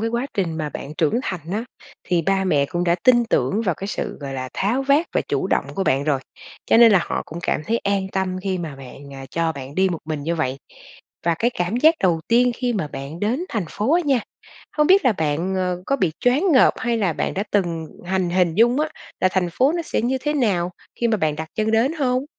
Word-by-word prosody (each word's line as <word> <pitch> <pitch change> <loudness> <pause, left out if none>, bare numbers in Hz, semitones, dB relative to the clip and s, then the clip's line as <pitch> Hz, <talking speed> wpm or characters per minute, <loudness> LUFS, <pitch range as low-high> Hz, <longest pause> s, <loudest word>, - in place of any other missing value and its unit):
cái 225 - 0
quá 235 +3 -1
trình 170 -5 -1
mà 155 -2 -2
bạn 145 0 -7
trưởng 170 +9 +1
thành 185 -3 -3
á, 215 +3 -2 0.4
thì 175 -2 +2
ba 195 +3 +1
mẹ 145 -6 +2
cũng 175 +3 -2
đã 170 - +3
tin 240 -2 +5
tưởng 220 -1 +1
vào 180 -6 0
cái 195 - -6
sự, 205 - -4
gọi 140 -1 -5
là, 130 -1 -4
tháo 235 +7 0
vát 280 +5 +3
và - - +2
chủ - - 0
động - - +1
của 195 - -1
bạn 135 -3 +1
rồi. 140 -4 +1 0.5
Cho - - +4
nên 230 -1 +8
là 195 - +6
họ - - -3
cũng 165 - -8
cảm 155 - -1
thấy 230 +1 +1
an 200 -1 0
tâm 190 -1 -1
khi 190 -1 -1
mà 160 -5 -6
bạn 135 +1 -11
à, 135 0 -8
cho 165 0 0
bạn 140 -1 -9
đi 190 +2 +3
một 175 -3 -3
mình 155 -2 -4
như 165 +4 -1
vậy. 135 -5 -1 0.7
Và 170 - +3
cái 240 - +2
cảm 175 +5 0
giác 315 +6 +5
đầu 175 -4 +2
tiên 245 +1 +4
khi 245 -1 -1
mà 190 -9 -2
bạn 140 +4 -7
đến 245 - 0
thành 210 -5 -2
phố 240 - 0
á 350 - +4
nha, 270 -4 +2 0.5
không 300 -1 +2
biết 385 +3 +5
là 250 - +5
bạn, 160 +1 -1
ờ, 180 -1 -1
có 275 - +1
bị 185 - 0
choáng 290 +9 +3
ngợp, 260 - +5
hay 240 -2 0
là 190 -6 +1
bạn - - -2
đã 200 - -1
từng 170 -5 0 0.2
hành 185 -1 0
hình 175 -2 +2
dung 240 - +4
á 310 - 0 0.3
là 185 - +4
thành 185 -2 +1
phố 265 - +3
nó 340 0 -1
sẽ 305 - -2
như 260 +3 0
thế 295 +3 -1
nào 195 -10 +1 0.3
khi 235 - +2
mà 220 - +2
bạn 155 -6 0
đặt 160 0 -5
chân 215 0 +1
đến 230 +6 +2
hông? 260 -4 0
190 Hz, 255 wpm, -22 LUFS, 165-240 Hz, 0.7 s, nên